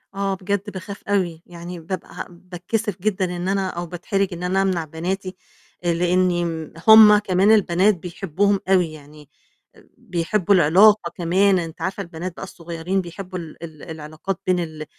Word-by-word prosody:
آه، 195 0 -1
بجد 200 +2 -3
باخاف 200 +1 -8
أوي. 180 -5 0
يعني 175 0 -9
بابقى 175 +2 -6
ه - - -5
باتكسِف 180 +3 -4
جدًا 200 -2 0
إن 175 +1 -4
أنا 195 -1 0
أو 175 -1 -5
باتحرِج 180 +3 -2
إن 175 +1 -7
أنا 185 +2 +1
أمنع 185 -4 0
بناتي، 185 +4 -4 0.5
آآ 175 -1 +1
لإنّي 175 +1 +1
ن 160 -2 -5
هم 215 -1 +9
كمان 195 0 +2
البنات 200 -1 +4
بيحبّوهم 190 +3 -1
أوي 180 -4 +3
يعني 150 -1 -14 0.5
آآ، - - -21
بيحبّوا 190 -2 0
العلاقة 185 +3 +5
كمان 185 +2 +2
أنتِ 165 -1 -7
عارفة 190 0 -3
البنات 170 +1 -6
بقى - - -8
الصغيّرين 175 +1 -3
بيحبّوا 185 +1 -7
ال 165 -1 -10
ال 155 -3 -10
العلاقات 160 +3 -6
بين 180 -1 +2
ال 155 -2 -5
180 Hz, 165 wpm, -22 LUFS, 170-195 Hz, 0.5 s, هم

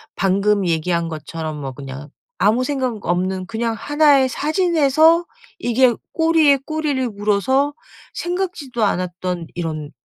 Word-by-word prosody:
방금 200 +1 +1
얘기한 170 +1 0
것처럼 160 -1 -6
뭐 135 - -4
그냥 135 +2 -9 0.3
아무 230 +5 +3
생각 255 -6 -2
없는 185 +1 -1
그냥 225 +3 -2
1 290 +3 +4
의 260 - +3
사진에서 320 +1 +3 0.3
이게 245 +1 +3 0.2
꼬리에 320 -3 +4
꼬리를 300 -5 -1
물어서 215 +8 +1 0.4
생각지도 345 -10 -3
않았던 180 -2 -2
이런 155 -3 -4
225 Hz, 265 characters per minute, -20 LUFS, 180-290 Hz, 0.4 s, 1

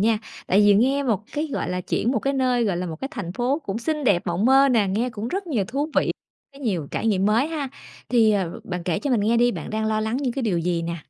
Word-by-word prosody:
nha, 220 +1 +3 0.3
tại 195 - +4
vì 205 -1 +6
nghe 265 +7 +3
một 220 -6 0
cái, 300 +2 -1
gọi - - -2
là, 180 - -2
chuyển 220 +5 -1
một 245 - +1
cái 275 +5 -1
nơi, 255 -3 +1
gọi 195 -5 0
là, 180 +1 -3
một 160 -2 -5
cái 270 - -3
thành 185 - -5
phố 250 +7 0
cũng 200 +2 -3
xinh 300 +5 -2
đẹp 200 -7 +3
mộng 175 +4 0
mơ 270 +2 +6
nè, 230 -6 +3
nghe 225 +6 0
cũng 220 0 -5
rất 390 +6 -3
nhiều 240 - 0
thú 280 +4 -2
vị, - - +3 0.4
có 275 - -15
nhiều 195 - -2
trải - - -2
nghiệm 195 -3 +2
mới 225 +6 +3
ha. 305 -4 -3 0.4
Thì, 225 -3 +4
ờ, 190 -5 -2
bạn 180 -1 -4
kể 170 -2 -1
cho 285 - -3
mình 240 -4 +3
nghe 220 +3 +2
đi, 240 +1 +4
bạn - - -6
đang 220 0 -1
lo 215 0 0
lắng 220 +2 -1
những 265 -2 -1
cái 270 - -3
điều 200 -7 +1
gì 170 0 -1
nè? 170 0 -3
225 Hz, 285 wpm, -23 LUFS, 195-265 Hz, 0.4 s, vì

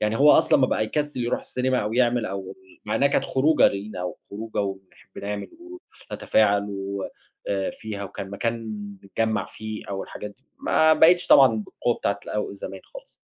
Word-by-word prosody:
يعني 105 +1 0
هو 145 +2 +7
أصلًا - - +5
ما 130 - +5
بقى 110 - 0
يكسِّل 145 +3 -2
يرُوح 120 - -1
السينيما، 130 0 -1
أو 105 +1 -2
يعمل 120 -2 +2
أو 95 0 -5 0.3
مع 105 - -2
إنها 140 - +3
كانت - - +1
خروجة 150 +4 +4
لينا، 100 -2 -5
وخروجة 105 +5 -5
وبنحب 95 -1 -7
نعمل 100 0 -4 0.6
ونتفاعل 100 -2 +2
و 100 0 -4 0.4
آآ 95 -1 0
فيها 105 -2 -6
وكان 95 0 -7
مكان 115 +2 -3 0.4
نتجمّع 110 +3 -1
فيه 110 +1 -7
أو 95 -1 -3
الحاجات 105 - -8
دي، 130 +6 -24
ما 160 - +4
بقِتش 175 +3 +5
طبعًا 135 -2 +8
بالقوة 115 +3 -2
بتاعة 100 -2 -1
الأو 105 -1 -3
زمان 95 -1 -8
خالص. - - -11
110 Hz, 170 wpm, -24 LUFS, 100-125 Hz, 0.6 s, طبعًا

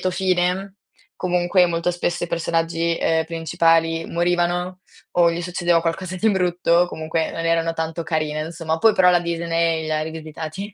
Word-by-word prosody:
lieto 185 - 0
fine. 185 +1 0 0.4
Comunque 180 0 +2
molto 170 +1 -1
spesso 175 0 -2
i - - -5
personaggi, 165 0 -1
ehm, 160 0 +1
principali 165 0 +1
morivano, 175 +1 -1 0.3
o 170 -1 +4
gli 170 - -3
succedeva 175 -1 +1
qualcosa 175 +2 -3
di 220 +5 +2
brutto, 175 -2 +2
comunque 160 -1 -2
non 165 - -5
erano 165 0 +1
tanto 160 +1 -3
carine, 155 -2 -2
insomma. 160 0 -3
Poi 220 +5 +5
però 180 -1 +5
la 175 -1 +3
Disney 170 -1 -1
li 155 - -5
ha 155 - 0
rivisitati. 160 +5 -7
170 Hz, 160 wpm, -21 LUFS, 165-180 Hz, 0.4 s, Poi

